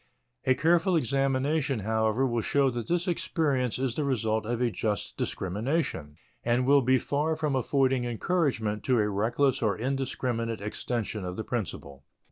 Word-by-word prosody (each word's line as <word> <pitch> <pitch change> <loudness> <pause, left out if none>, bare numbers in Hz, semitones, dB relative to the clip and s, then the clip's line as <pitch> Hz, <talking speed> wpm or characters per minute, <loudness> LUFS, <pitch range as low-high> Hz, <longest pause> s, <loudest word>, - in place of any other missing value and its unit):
A 130 - +4
careful 170 +6 +3
examination, 135 -1 +1
however, 110 +4 +1
will 120 -3 0
show 140 +3 +2
that 120 -2 -4
this 175 +2 0
experience 145 -8 0
is 130 -2 -1
the 150 - -1
result 110 -5 0
of 120 0 -1
a 125 -2 +1
just 105 -2 -2
discrimination 100 - -2 0.3
and 120 +2 +2
will 140 +1 +5
be 130 +1 +4
far 150 +5 0
from 155 -3 -1
affording 130 0 +2
encouragement 120 - 0
to 130 -2 +3
a 105 -2 +2
reckless 120 +7 +1
or 105 -4 +1
indiscriminate 125 -2 -2
extension 105 0 -3
of 90 0 -4
the 110 - -4
principle. 70 - -5
125 Hz, 155 wpm, -28 LUFS, 110-140 Hz, 0.3 s, will